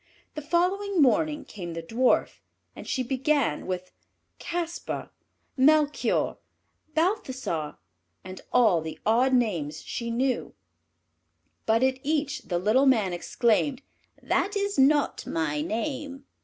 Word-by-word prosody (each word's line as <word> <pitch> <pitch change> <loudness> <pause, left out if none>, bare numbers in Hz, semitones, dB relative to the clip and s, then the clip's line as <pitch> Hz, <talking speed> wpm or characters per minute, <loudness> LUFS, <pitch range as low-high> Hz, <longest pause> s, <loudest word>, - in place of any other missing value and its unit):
The 305 - -5
following 365 +5 0
morning 295 +3 +2
came 175 -5 -7
the 165 - -5
Dwarf, 240 +9 +1 0.4
and - - -10
she 260 - -1
began 265 - 0
with 185 0 -4 0.5
"Caspar," 345 0 -4 0.4
"Melchior," 295 +2 +2 0.6
"Balthassar," 260 - -1 0.5
and 185 0 -9
all 215 -9 +4
the 160 0 -6
odd 240 +4 +3
names 170 - 0
she 235 -1 -4
knew; 255 +3 -1 1.1
but 225 +2 +3
at 260 0 +1
each 295 0 -1
the 175 - 0
little 220 +10 +3
Man 215 -8 +3
exclaimed, 240 +9 0 0.4
"That 405 - 0
is 400 -5 -1
not 290 +2 +3
my 150 -2 -1
name." 270 - -4
260 Hz, 115 wpm, -26 LUFS, 195-300 Hz, 1.1 s, all